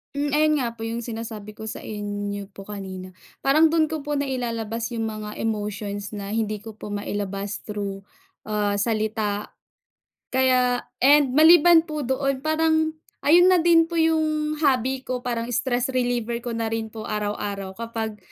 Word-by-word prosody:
Mm. 290 Hz, 0 st, 0 dB
Ayun 305 Hz, +2 st, +3 dB
nga 235 Hz, -, 0 dB
po 225 Hz, -, -5 dB
'yong 230 Hz, +1 st, -3 dB
sinasabi 220 Hz, -2 st, -7 dB
ko 220 Hz, -, -7 dB
sa 220 Hz, -, -5 dB
inyo 205 Hz, -1 st, -4 dB
po 195 Hz, -, -10 dB
kanina. 190 Hz, -2 st, -6 dB, 0.3 s
Parang 305 Hz, +4 st, +5 dB
do'n 315 Hz, -2 st, +3 dB
ko 310 Hz, -2 st, -4 dB
po 295 Hz, -, -2 dB
nailalabas 235 Hz, -4 st, -2 dB
'yong 225 Hz, -, -2 dB
mga 210 Hz, -1 st, -6 dB
emotions 205 Hz, -1 st, -3 dB
na 200 Hz, -1 st, -5 dB
hindi 215 Hz, -1 st, -1 dB
ko 220 Hz, -1 st, -10 dB
po 205 Hz, -, -7 dB
mailabas 200 Hz, 0 st, -4 dB
through, 200 Hz, -2 st, -5 dB, 0.4 s
ah, 205 Hz, -1 st, 0 dB
salita. 215 Hz, -1 st, -1 dB, 0.8 s
Kaya 255 Hz, -1 st, +3 dB, 0.2 s
and 280 Hz, -1 st, +5 dB
maliban 330 Hz, +1 st, +7 dB
po 305 Hz, -3 st, -4 dB
doon, 265 Hz, +1 st, -1 dB
parang 315 Hz, +1 st, +1 dB, 0.2 s
ayun 350 Hz, +5 st, +6 dB
na 355 Hz, -, +5 dB
din 335 Hz, -1 st, +5 dB
po 335 Hz, 0 st, -1 dB
'yong 310 Hz, -1 st, +1 dB
hobby 265 Hz, -3 st, +1 dB
ko. 255 Hz, -1 st, -3 dB
Parang 235 Hz, -2 st, -2 dB
stress 250 Hz, +2 st, 0 dB
reliever 240 Hz, -2 st, -1 dB
ko 235 Hz, -1 st, -4 dB
na 225 Hz, -1 st, -2 dB
rin 225 Hz, -1 st, -2 dB
po 220 Hz, 0 st, -8 dB
araw-araw 205 Hz, -2 st, -3 dB
kapag 225 Hz, -2 st, -4 dB
230 Hz, 160 wpm, -24 LUFS, 210-285 Hz, 0.8 s, maliban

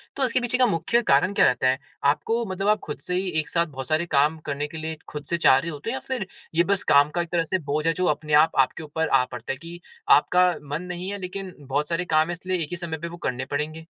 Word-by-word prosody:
तो 275 Hz, -, -1 dB
उसके 250 Hz, -1 st, +2 dB
पीछे 240 Hz, +1 st, 0 dB
का 255 Hz, -, +5 dB
मुख्य 205 Hz, +4 st, +1 dB
कारण 145 Hz, +8 st, +4 dB
क्या -, -, +5 dB
रहता 125 Hz, +1 st, +2 dB
है? 130 Hz, +1 st, +2 dB, 0.2 s
आपको 150 Hz, +12 st, +1 dB
मतलब 195 Hz, 0 st, -3 dB
आप 210 Hz, 0 st, +4 dB
खुद 150 Hz, -, -6 dB
से 180 Hz, -, -5 dB
ही 190 Hz, +1 st, -1 dB
एक 150 Hz, -2 st, -3 dB
साथ 170 Hz, +2 st, +1 dB
बहुत 135 Hz, -4 st, -7 dB
सारे 155 Hz, +2 st, +1 dB
काम 150 Hz, 0 st, +2 dB
करने 145 Hz, +1 st, -2 dB
के 160 Hz, -, -9 dB
लिए 160 Hz, 0 st, -5 dB
खुद 150 Hz, -1 st, -7 dB
से 170 Hz, -, +1 dB
चाह 130 Hz, -5 st, +6 dB
रहे 165 Hz, +5 st, -2 dB
होते 145 Hz, +8 st, -6 dB
है 235 Hz, -, -2 dB
या 265 Hz, -, -3 dB
फिर 250 Hz, -8 st, -3 dB, 0.3 s
ये 170 Hz, -, +5 dB
बस 200 Hz, 0 st, +1 dB
काम 145 Hz, +1 st, +6 dB
का 175 Hz, -, +2 dB
एक 170 Hz, -, -5 dB
तरह 170 Hz, -1 st, +2 dB
का 190 Hz, -, +3 dB
भोज 155 Hz, +2 st, 0 dB
है 165 Hz, -, +3 dB
जो 180 Hz, +3 st, -1 dB
अपने 150 Hz, -1 st, -6 dB
आप 155 Hz, +2 st, +6 dB
आपके 130 Hz, -, +3 dB
के -, -, -7 dB
ऊपर 160 Hz, +1 st, -2 dB
आ -, -, +4 dB
पड़ता 120 Hz, +1 st, -5 dB
है -, -, -8 dB
कि 170 Hz, +4 st, -10 dB, 0.3 s
आपका 180 Hz, +5 st, +5 dB, 0.2 s
मन 150 Hz, +4 st, -2 dB
नहीं 180 Hz, +1 st, -5 dB
है 205 Hz, -, -4 dB
लेकिन 185 Hz, 0 st, -6 dB
बहुत 145 Hz, +2 st, -2 dB
सारे 170 Hz, +1 st, -1 dB
काम 155 Hz, +1 st, +4 dB
है 175 Hz, -, -3 dB
इसलिए 185 Hz, +2 st, -3 dB
एक 150 Hz, -, -7 dB
ही -, -, -2 dB
समय 170 Hz, -2 st, -4 dB
पे 170 Hz, +2 st, -5 dB
वो 170 Hz, -, -8 dB
करने 130 Hz, +1 st, -2 dB
पड़ेंगे। 155 Hz, +3 st, -3 dB
165 Hz, 285 wpm, -24 LUFS, 150-185 Hz, 0.3 s, चाह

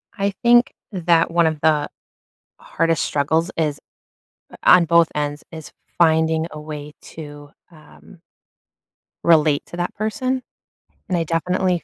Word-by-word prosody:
I 200 Hz, -1 st, -1 dB
think 240 Hz, +1 st, +4 dB, 0.2 s
that 170 Hz, -3 st, +1 dB
one 170 Hz, -1 st, +3 dB
of 155 Hz, -1 st, -2 dB
the 150 Hz, -2 st, +2 dB, 0.7 s
hardest 165 Hz, -1 st, -1 dB
struggles 160 Hz, +5 st, 0 dB
is 150 Hz, -3 st, -1 dB, 0.8 s
on 180 Hz, -1 st, +6 dB
both 170 Hz, 0 st, +4 dB
ends, 145 Hz, 0 st, -3 dB
is 160 Hz, -2 st, -10 dB, 0.3 s
finding 160 Hz, -1 st, +2 dB
a 155 Hz, -, -8 dB
way 150 Hz, -1 st, -8 dB
to, 145 Hz, -2 st, -11 dB, 0.2 s
um 165 Hz, +2 st, -18 dB, 1.0 s
relate 155 Hz, -3 st, +3 dB
to -, -, -11 dB
that 175 Hz, 0 st, -3 dB
person, 255 Hz, +5 st, -2 dB, 0.7 s
and 180 Hz, -, 0 dB
I 165 Hz, -, 0 dB
definitely 180 Hz, +2 st, -1 dB
165 Hz, 125 wpm, -20 LUFS, 155-175 Hz, 1.0 s, on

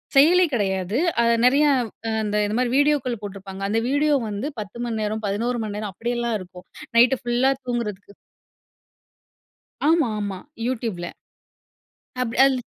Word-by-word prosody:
செயலி 335 Hz, +7 st, +6 dB
கெடையாது. 195 Hz, -1 st, 0 dB, 0.2 s
அது 235 Hz, 0 st, +4 dB
நெறைய 280 Hz, +4 st, +5 dB, 0.6 s
அந்த 210 Hz, 0 st, -2 dB
இது 210 Hz, +1 st, -2 dB
மாரி 250 Hz, -1 st, +1 dB
வீடியோக்கள் 285 Hz, -4 st, +2 dB
போட்டுருப்பாங்க. 195 Hz, -1 st, -8 dB
அந்த 220 Hz, +3 st, +1 dB
வீடியோ 290 Hz, +1 st, +3 dB
வந்து 210 Hz, +7 st, -3 dB
10 210 Hz, +2 st, -7 dB
மணி 225 Hz, -2 st, -3 dB
நேரம் 215 Hz, +1 st, -2 dB
11 230 Hz, +5 st, -1 dB
மணி 205 Hz, -1 st, -4 dB
நேரம் 210 Hz, -1 st, -4 dB
அப்படியெல்லாம் 235 Hz, 0 st, -2 dB
இருக்கும். 180 Hz, 0 st, -12 dB, 0.3 s
நைட்டு 245 Hz, +2 st, +6 dB
ஃபுல்லா 245 Hz, +2 st, +2 dB
தூங்குறதுக்கு. 210 Hz, -5 st, -4 dB, 1.8 s
ஆமா, 320 Hz, -6 st, +4 dB
ஆமா. 200 Hz, -2 st, -3 dB, 0.3 s
Youtube 230 Hz, -6 st, -2 dB
ல. -, -, -3 dB, 1.2 s
அப் 230 Hz, -2 st, -2 dB
அல் 270 Hz, -1 st, +2 dB
230 Hz, 135 wpm, -23 LUFS, 205-255 Hz, 1.8 s, செயலி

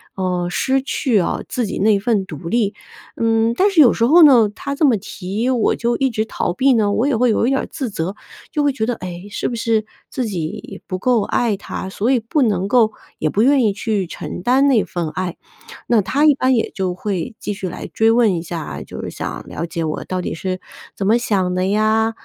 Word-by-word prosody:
呃， 180 Hz, -2 st, -1 dB
失 265 Hz, +8 st, +1 dB
去 260 Hz, -4 st, 0 dB
哦， 175 Hz, -, -1 dB
自 245 Hz, -, -1 dB
己 195 Hz, -, -4 dB
那 210 Hz, +2 st, +4 dB
一 -, -, 0 dB
份 210 Hz, -2 st, 0 dB
独 160 Hz, -2 st, -8 dB
立。 220 Hz, -2 st, +1 dB, 0.4 s
嗯， 225 Hz, 0 st, +2 dB
但 400 Hz, -, +4 dB
是 365 Hz, -, +2 dB
有 245 Hz, -, +7 dB
时 230 Hz, -, +1 dB
候 325 Hz, +8 st, +6 dB
呢， 245 Hz, -8 st, +7 dB
他 280 Hz, -, -4 dB
这 295 Hz, -, -2 dB
么 260 Hz, -5 st, +4 dB
提 200 Hz, +5 st, -4 dB
我 250 Hz, -3 st, +2 dB
就 235 Hz, 0 st, 0 dB
一 270 Hz, -, +1 dB
直 220 Hz, -3 st, -1 dB
逃 200 Hz, -, -2 dB
避 265 Hz, +7 st, +3 dB
呢， 215 Hz, -4 st, +2 dB
我 230 Hz, +6 st, +1 dB
也 285 Hz, -, +1 dB
会 250 Hz, +1 st, +3 dB
有 225 Hz, -, +2 dB
一 -, -, +2 dB
点 270 Hz, 0 st, +1 dB
儿 -, -, -5 dB
自 270 Hz, -6 st, -4 dB
责。 185 Hz, -1 st, -3 dB, 0.4 s
就 300 Hz, -, 0 dB
会 290 Hz, -, +3 dB
觉 220 Hz, -4 st, -1 dB
得， 245 Hz, +1 st, -1 dB
哎， 180 Hz, -1 st, -8 dB
是 210 Hz, -, -3 dB
不 240 Hz, -, -4 dB
是 225 Hz, -2 st, 0 dB, 0.2 s
自 255 Hz, -, -3 dB
己 170 Hz, -7 st, -5 dB
不 185 Hz, -, -3 dB
够 240 Hz, 0 st, +2 dB
爱 230 Hz, -1 st, 0 dB
他， 190 Hz, -, -6 dB
所 205 Hz, +4 st, -1 dB
以 260 Hz, -, +3 dB
不 235 Hz, +7 st, 0 dB
能 200 Hz, -6 st, +1 dB
够， 225 Hz, -2 st, +4 dB, 0.3 s
也 155 Hz, -, 0 dB
不 200 Hz, -, +1 dB
愿 270 Hz, +2 st, +4 dB
意 215 Hz, -, +3 dB
去 210 Hz, -2 st, -1 dB
承 175 Hz, -, -7 dB
担 265 Hz, +3 st, +3 dB
那 235 Hz, -6 st, +4 dB
份 170 Hz, -3 st, -3 dB
爱。 180 Hz, +1 st, -4 dB, 0.5 s
那 230 Hz, -3 st, +4 dB
他 280 Hz, +10 st, +1 dB
一 295 Hz, -2 st, +6 dB
般 260 Hz, -1 st, +2 dB
也 225 Hz, -, 0 dB
就 185 Hz, -2 st, -1 dB
会 200 Hz, +4 st, -4 dB
继 210 Hz, -, -3 dB
续 195 Hz, -1 st, -5 dB
来 -, -, -7 dB
追 225 Hz, 0 st, +2 dB
问 230 Hz, -3 st, +4 dB
一 165 Hz, -, -2 dB
下 170 Hz, 0 st, -5 dB
啊， -, -, -6 dB
就 -, -, -8 dB
是 -, -, -4 dB
想 -, -, -6 dB
了 -, -, -4 dB
解 165 Hz, 0 st, -4 dB
我 155 Hz, -1 st, -3 dB
到 185 Hz, -1 st, -3 dB
底 -, -, -4 dB
是 185 Hz, +3 st, -3 dB, 0.4 s
怎 195 Hz, -, -3 dB
么 225 Hz, +3 st, +5 dB
想 195 Hz, -6 st, 0 dB
的 185 Hz, 0 st, 0 dB
呀。 215 Hz, +2 st, +2 dB
220 Hz, 260 characters per minute, -19 LUFS, 185-245 Hz, 0.5 s, 有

